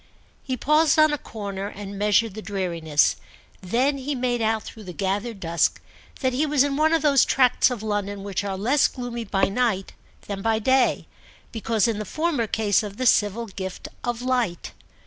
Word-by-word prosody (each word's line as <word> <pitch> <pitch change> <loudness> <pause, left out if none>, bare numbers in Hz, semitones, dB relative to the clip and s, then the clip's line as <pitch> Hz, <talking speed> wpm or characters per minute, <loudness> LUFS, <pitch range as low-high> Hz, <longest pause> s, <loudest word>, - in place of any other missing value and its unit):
He 260 -2 -3
paused 305 +4 +3
on 310 -1 +5
a - - 0
corner 200 -4 -6
and 205 -1 -8
measured 210 +1 +2
the 215 - -7
dreariness; 170 -7 0 0.4
then 255 +9 0
he 280 +2 -3
made 245 -2 -1
out 220 0 0
through 220 -2 -10
the 180 - -7
gathered 200 +4 -2
dusk 170 -2 0 0.4
that 260 -2 +1
he 270 +5 +1
was 295 -3 +3
in 285 -1 -1
one 310 +2 +3
of 330 -1 +2
those 280 -4 +5
tracts 255 -1 +3
of 240 -4 -5
London 205 -2 -3
which 200 -1 -3
are 195 -1 -3
less 255 +9 +3
gloomy 240 -2 -6
by 195 -1 -1
night 200 -2 -1 0.3
than 200 -1 -5
by 225 +1 +1
day, 260 +4 +2 0.4
because, 225 0 0
in 225 -2 -1
the - - -2
former 310 - -1
case 210 -1 +2
of 205 -1 -7
the 255 - -2
civil 215 0 +3
gift 190 -3 -7
of 240 0 -3
light. 245 -9 -1
225 Hz, 185 wpm, -24 LUFS, 200-255 Hz, 0.4 s, on